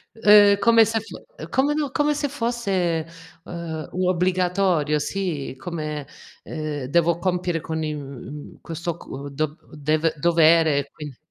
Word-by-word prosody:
Uhm, 205 -2 +7
come 230 +1 +6
se 225 +1 -1
f 220 - -11 0.5
come 280 +3 +2
no 295 -3 -1
come 295 +1 +1
se 290 0 -1
fosse, 200 - -1 0.4
ehm, 160 -3 -6
u 185 0 -1
obbligatorio. 180 -4 +1
Sì. 155 -6 -3
Come, 150 -2 -5 0.4
ehm, 150 -4 -4
devo 170 +4 +2
compiere 175 -1 -1
con 160 0 -3
i 155 -1 -2
uhm, 140 0 -9
questo 170 0 -5
co 140 -1 -8
dov 155 +2 -3 0.2
dev 155 +2 0
dovere 165 -1 +4
e 140 - -5
quin 145 -4 -9
170 Hz, 145 wpm, -23 LUFS, 150-195 Hz, 0.5 s, Uhm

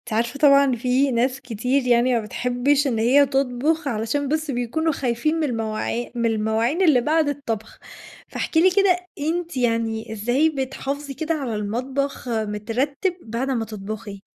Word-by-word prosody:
أنتِ 235 - -10
عارفة 230 +5 -1
طبعًا 280 -1 +6
إن 260 -3 +1
في 255 +4 +1
ناس 255 +2 0
كتير 250 +2 -1
يعني 245 +1 +3
ما 235 - +2
بتحبِّش 250 +6 0
إن 240 -5 0
هي 265 +6 +5
تطبخ، 275 +3 0
علشان 235 +5 -1
بس 310 +1 -1
بيكونوا 270 +6 -1
خايفين 260 +2 0
من - - +1
المواعي 230 -1 -3
من 235 -1 0
المواعين 225 - +1
اللي 305 -9 +5
بعد 310 +3 +2
الطبخ، 230 -6 -4 0.5
فاحكِ - - -4
لي 355 +4 +6
كده، 380 -1 +4 0.3
أنتِ 340 -2 -2
يعني 230 -3 -1
إزاي 240 +8 +2
بتحافظي 275 0 -4
كده 315 +4 -2
على 270 -7 -3
المطبخ 255 +6 -3
مترتِّب 235 - -1
بعد 235 +4 -3
أمّا 235 -4 0
تطبخي. 205 -1 -7
250 Hz, 160 wpm, -22 LUFS, 230-285 Hz, 0.5 s, طبعًا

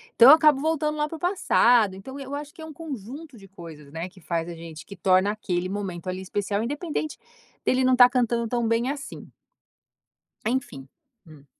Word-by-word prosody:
então 240 +3 +9
eu - - +12
acabo 300 -4 +4
voltando 305 -1 0
lá 300 0 -1
para 325 - -6
o - - -17
passado. 245 - +3
Então, 265 +9 -9
eu 275 0 -7
acho 295 0 -6
que 320 - -13
é - - -7
um 315 - -9
conjunto 280 -1 -8
de 195 -2 -15
coisas, 160 -6 -12
né, 165 +3 -5
que 185 -1 -18
faz 165 0 -2
a 175 - -6
gente 165 -2 -10
que 200 - -10
torna 185 +2 +3
aquele 185 -4 -3
momento 185 -3 -5
ali 185 +1 -3
especial, 200 +2 -2
independente 295 +3 -3 0.5
dele 255 0 +2
não 255 0 +4
estar 250 0 +7
cantando 235 -2 0
tão 240 0 -1
bem 230 +3 +1
assim. 280 -1 -7 1.2
Enfim, 225 - -3 0.4
hum. 150 -3 -16
230 Hz, 195 wpm, -25 LUFS, 185-280 Hz, 1.2 s, eu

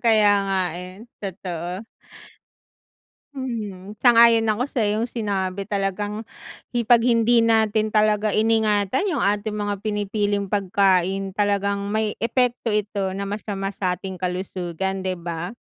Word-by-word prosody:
Kaya 215 -3 +5 0.2
nga 195 -1 0 0.2
eh 180 - -8 0.3
totoo. 180 -1 -5 1.5
Mhm, 215 -7 -5
sang-ayon 230 -1 +6
ako 220 +2 +1
sa 240 -6 0
iyong 215 +3 0
sinabi 200 -4 -2
talagang 205 +1 -2 0.6
i 240 - +1
pag 235 +1 +5
hindi 235 0 +4
natin 220 -1 +2
talaga 215 0 +2
iningatan 215 - +2
yung 300 -9 0
ating 210 +1 0
mga 205 -1 -2
pinipiling 205 -1 -1
pagkain 195 -1 +1
talagang 200 0 0
may 215 0 0
epekto 245 0 0
ito 205 -2 -1
na 200 - -3
masama 200 -1 -4
sa 180 -2 -1
ating 190 0 -8
kalusugan 185 0 -3
di 185 -1 -2
ba? 170 +5 -5
205 Hz, 125 wpm, -23 LUFS, 195-220 Hz, 1.5 s, sang-ayon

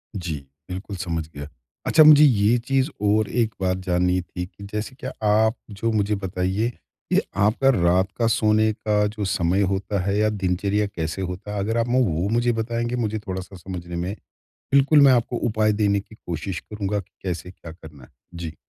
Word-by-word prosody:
जी, 85 -5 -3 0.3
बिल्कुल 95 +2 -6
समझ 85 -4 -3
गया। 70 0 -6 0.4
अच्छा 155 - +6
मुझे 150 -1 +8
ये 115 -4 +4
चीज़ 135 +1 +2
और 105 +1 +2
एक 115 -2 0
बात 95 -1 +1
जाननी 90 0 +1
थी 90 0 -6
कि 100 +2 -15
जैसे 105 +5 -4
क्या - - -5 0.2
आप 110 +2 +3
जो 110 +3 -2
मुझे 105 -1 +1
बताइए 95 +3 -1
कि 120 - -3
आपका 105 +7 +3
रात 90 +1 +2
का 115 - +3
सोने 110 -1 +3
का 105 -1 0
जो 105 - -2
समय 90 +1 +1
होता 100 +1 -2
है 100 +1 0
या 110 0 +3
दिनचर्या 100 +1 0
कैसे 80 -2 -4
होता 95 +3 -5
है? 105 - -2
अगर 110 +4 -1
आप 115 0 +1
ना 125 +1 +1
वो 90 -5 +1
मुझे 120 +2 +2
बताएँगे 120 +1 -2
मुझे 110 -3 -1
थोड़ा 95 0 -3
सा 95 +1 -12
समझने 90 -1 -7
में 90 +4 -3 0.6
बिल्कुल, 140 +2 +6
मैं 140 -1 +7
आपको 120 0 +1
उपाय 110 -1 +2
देने 100 -1 +2
की 105 +2 -13
कोशिश 85 +2 -4
करूँगा 105 -1 -3
कि 95 0 -12
कैसे 90 -1 -4
क्या 85 -3 -11
करना 80 -5 -14
है? - - -16 0.2
जी। 85 -2 -6
100 Hz, 195 wpm, -23 LUFS, 90-110 Hz, 0.6 s, मुझे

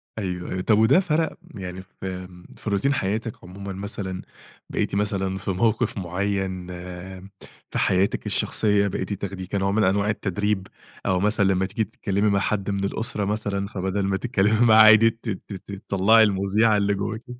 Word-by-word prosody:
أيوه، 90 -4 -4
أيوه 95 - -2
طب 105 +2 +3
وده 115 +11 +5
فَرَق 160 -3 0 0.2
يعني 95 -1 -6
في 95 0 -7 0.3
في - - -5
روتين 120 +8 +1
حياتِك 110 0 -3
عمومًا 95 +2 -7
مثلًا؟ 95 -1 -5 0.5
بقيتِ - - -1
مثلًا 95 -2 -1
في 95 +1 -3
موقف 110 +3 +1
معين 95 0 -2 1.0
في - - -3
حياتِك 95 +2 +1
الشخصية، 105 -2 +1
بقيتِ 100 +1 -3
تاخديه 95 -1 -5
كنوع 95 +1 0
من 105 +1 +2
أنواع 100 +2 +2
التدريب، 105 -1 -1 0.4
أو 90 -1 +2
مثلًا 105 0 +2
لمّا 95 0 +2
تيجي 105 +4 -1
تتكلمي 100 +1 -1
مع 100 -1 +2
حد 100 0 -1
من 100 0 -1
الأسرة 105 0 -2
مثلًا، 100 -1 -2
فبدل 95 -1 -2
ما 95 0 0
تتكلمي 110 0 +2
معاه 110 -1 +8
عادي 110 +1 +8
ت 115 +1 -8
ت 100 0 -7 0.2
تطلّعي 110 +4 +5
المُذيعة 105 +2 +2
اللي 100 0 +1
جواكِ؟ 105 +3 -4
100 Hz, 160 wpm, -24 LUFS, 95-110 Hz, 1.0 s, معاه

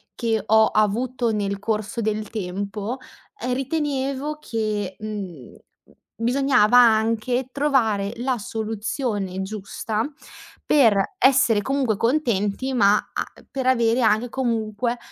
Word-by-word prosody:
che 225 -3 0
ho 220 0 +5
avuto 230 +3 0
nel 200 -1 -2
corso 215 +2 -2
del 215 -1 -2
tempo, 200 +3 -4 0.5
uhm 250 - 0
ritenevo 275 +1 -2
che, 215 -7 -3
mhmm, 195 - -7 0.6
bisognava 245 -1 +3
anche 230 +2 +3
trovare 230 -8 +1
la 250 +1 -1
soluzione 215 -2 -3
giusta 215 +4 -3 0.6
per 225 -9 +3
essere 255 -5 +4
comunque 265 -3 0
contenti, 235 -1 0
ma 205 -4 +5 0.2
a - - -1 0.3
per 265 -1 -3
avere 235 -1 +3
anche 220 +1 +2
comunque 235 -1 -1
225 Hz, 105 wpm, -23 LUFS, 210-255 Hz, 0.6 s, ho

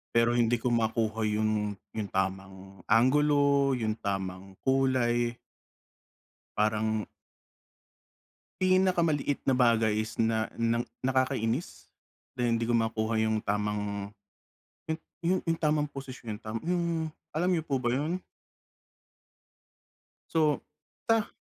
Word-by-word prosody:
Pero 115 0 +4
hindi 120 0 +3
ko 120 +1 -1
makuha 110 -1 +1
yung 105 -1 0 0.2
yung 105 -3 -4
tamang 95 0 -3
anggulo, 140 +3 +4
yung 110 -3 -1
tamang 95 -1 -4
kulay. 125 -3 +2 1.2
Parang 110 0 +1 1.5
Pinakamaliit 180 -6 +2
na 135 - +3
bagay 115 -4 +3
is 110 0 -7
na 110 -1 +1
ng 115 0 +1 0.2
nakakainis 130 +1 0 0.5
na 125 -2 0
hindi 115 0 +1
ko 120 - 0
makuha 110 -1 +1
yung 110 0 +1
tamang 105 -1 -2 0.8
he 160 - 0 0.2
yun, 180 +2 0
yung 165 -1 -1
tamang 150 -2 +1
posisyon, 130 -6 -7
tama 110 0 -5
yung 170 -2 -1 0.2
alam 175 +4 +1
niyo 165 -3 0
po 140 - -1
ba 120 - +1
yun? 155 +8 -1 2.1
To, 155 -3 +3 0.5
ta 225 -2 +2
115 Hz, 110 wpm, -29 LUFS, 110-145 Hz, 2.1 s, Pero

